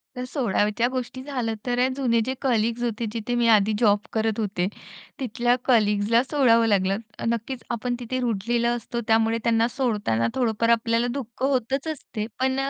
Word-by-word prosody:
तर 250 - -4
सोडायच्या 230 -3 0
गोष्टी 255 0 -4
झाल्या 250 -6 -2
तर 245 +1 +2
जुने 245 -4 +1
जे 260 - -1
कलीग्स 235 -2 +1
होते 230 -1 -2
जिथे 235 +1 -3
मी 240 -1 +2
आधी 210 +1 +2
जॉब 205 -3 +4
करत 220 0 0
होते, 195 -4 -1 0.5
तिथल्या 240 -1 +1
कलीग्जला 215 -1 +3
सोडावं 240 -5 +3
लागलं. 195 -2 +2 0.3
नक्कीच 235 +2 -3
आपण 245 +1 -2
तिथे 250 +2 -3
रूळलेलो 235 0 0
असतो 235 0 -4
त्यामुळे 225 0 +3
त्यांना 230 0 +3
सोडताना 215 - 0
थोडंफार 230 -2 +1
आपल्याला 230 +1 +2
दुःख 245 -1 -7
होतच 270 +2 0
असते. 245 -8 -5
पण 260 +1 +1
अ, 270 0 -1
235 Hz, 160 wpm, -24 LUFS, 220-250 Hz, 0.5 s, जॉब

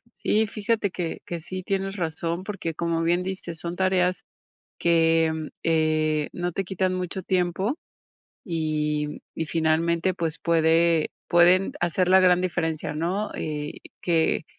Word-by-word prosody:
Sí, 220 +1 +1
fíjate 210 -1 -1
que 175 -2 -4
que 170 - -4
sí 185 +3 -6
tienes 195 +1 -2
razón, 170 +1 -2
porque 190 -5 -4
como 165 0 -1
bien 175 +2 +2
dices, 180 -3 -5
son 170 +1 -4
tareas 185 -1 +1 0.5
que, 165 -1 +3 0.3
eh, 155 -2 +1
no 175 0 -2
te 195 - -2
quitan 185 0 -1
mucho 185 +1 -3
tiempo 185 - 0 0.7
y 150 -3 -1
y 160 - -3
finalmente, 165 +3 +1
pues, 165 -2 -3
puede 165 -1 +3 0.2
pueden 175 +2 +5
hacer 175 +1 +1
la 190 +1 +7
gran 180 -1 +5
diferencia, 165 -4 -2
¿no?, 180 +7 -1
eh, 150 -1 -4 0.3
que, 165 -2 +1
170 Hz, 135 wpm, -25 LUFS, 160-185 Hz, 0.7 s, la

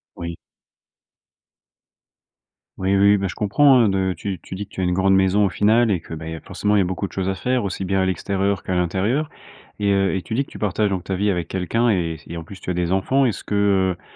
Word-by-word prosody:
Oui. 85 0 -6 2.4
Oui, 95 +1 +1
oui, 100 +1 +5
bah, 95 0 -1
je 90 - -6
comprends, 130 +5 +4
heu, 105 - +3
de 95 -1 0
tu 95 0 -4
tu 95 - -8
dis 105 +2 -5
que - - -35
tu - - -6
as - - 0
une 90 - +1
grande 95 +1 +3
maison 95 +2 +3
au - - +1
final 110 +4 +3
et 90 - +1
que, 80 - -11
beh, 80 0 -6
il - - -6
y - - -4
a - - -7
forcément 105 0 -1
il - - +4
y - - +4
a - - +1
beaucoup 95 +2 -3
de 90 - -8
choses 95 0 -3
à 95 - 0
faire 125 0 -1
aussi 95 0 -3
bien 95 +1 0
à - - +2
l'extérieur 95 +2 -1
qu'à 95 - -3
l'intérieur 100 - 0 0.5
et 100 -1 +1
heu, 95 0 +2
et 95 - -1
tu 110 - -5
dis 135 +2 0
que - - -21
tu - - -9
partages 105 0 0
donc 95 -2 -2
ta 95 - -3
vie 100 +2 +1
avec 85 -3 -2
quelqu'un 115 +6 0
et 85 -5 0
et 85 - -6
en 80 - -7
plus 95 +1 -12
tu - - -6
as - - 0
des 90 +1 -1
enfants. 130 +8 +2
Est-ce 115 - -2
que, 105 - -3 0.4
heu, - - -29
95 Hz, 270 wpm, -21 LUFS, 90-105 Hz, 2.4 s, oui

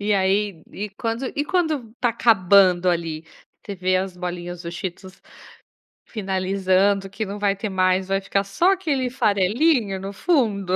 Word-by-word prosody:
E 205 +1 0
aí 195 -2 0
e 210 0 -5
quando 230 +5 -3
e 290 - 0
quando 315 -10 -1
está 245 0 0
acabando 190 -5 +4
ali? 165 -2 -3 0.4
Você 200 - -6
vê 185 0 +1
as 185 -1 -3
bolinhas 175 0 -5
do 170 - -6
Cheetos 185 +1 -7 0.9
finalizando, 195 -1 0
que 215 +3 -4
não 200 +1 -6
vai 200 -1 +1
ter 215 +2 -4
mais, 185 0 +1
vai 195 0 0
ficar 195 +1 0
só 335 - +2
aquele 285 -9 -1
farelinho 215 - +1
no 195 +1 -6
fundo. 200 - +1
195 Hz, 155 wpm, -22 LUFS, 185-225 Hz, 0.9 s, acabando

